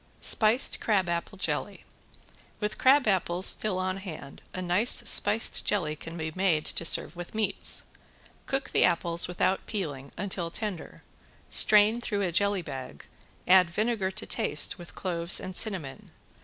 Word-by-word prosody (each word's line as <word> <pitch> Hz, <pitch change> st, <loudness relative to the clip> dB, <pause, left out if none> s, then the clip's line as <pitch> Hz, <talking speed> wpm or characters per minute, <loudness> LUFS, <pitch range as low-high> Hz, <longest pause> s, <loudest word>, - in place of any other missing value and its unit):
~SPICED 225 Hz, +4 st, +1 dB
CRABAPPLE 185 Hz, -2 st, -1 dB
JELLY~ 185 Hz, -, -4 dB, 0.8 s
With 210 Hz, 0 st, -3 dB
crabapples 195 Hz, -9 st, +3 dB
still 210 Hz, -4 st, +4 dB
on 185 Hz, 0 st, -2 dB
hand 160 Hz, -8 st, -9 dB
a -, -, -6 dB
nice 190 Hz, +7 st, +1 dB
spiced 215 Hz, +1 st, +2 dB
jelly 165 Hz, -7 st, -1 dB
can 165 Hz, +2 st, -9 dB
be 160 Hz, -1 st, -4 dB
made 180 Hz, -4 st, +1 dB
to -, -, -2 dB
serve 165 Hz, 0 st, 0 dB
with 175 Hz, +4 st, -9 dB
meats. 215 Hz, -3 st, 0 dB, 0.6 s
Cook 270 Hz, 0 st, -3 dB
the -, -, +3 dB
apples 170 Hz, 0 st, +2 dB
without 180 Hz, +2 st, 0 dB
peeling 145 Hz, -10 st, -5 dB
until 180 Hz, -2 st, -3 dB
tender. 195 Hz, -1 st, -6 dB, 0.5 s
Strain 215 Hz, +2 st, +5 dB
through 205 Hz, -4 st, -2 dB
a 180 Hz, -, -1 dB
jelly 200 Hz, +1 st, +1 dB
bag, 130 Hz, -, -8 dB, 0.4 s
add 180 Hz, -1 st, +6 dB
vinegar 210 Hz, +1 st, -1 dB
to 190 Hz, -, -7 dB
taste 150 Hz, +5 st, +1 dB
with 175 Hz, -, -11 dB
cloves 170 Hz, -1 st, +1 dB
and 185 Hz, -1 st, -7 dB
cinnamon. 185 Hz, -12 st, -3 dB
185 Hz, 140 wpm, -28 LUFS, 170-210 Hz, 0.8 s, add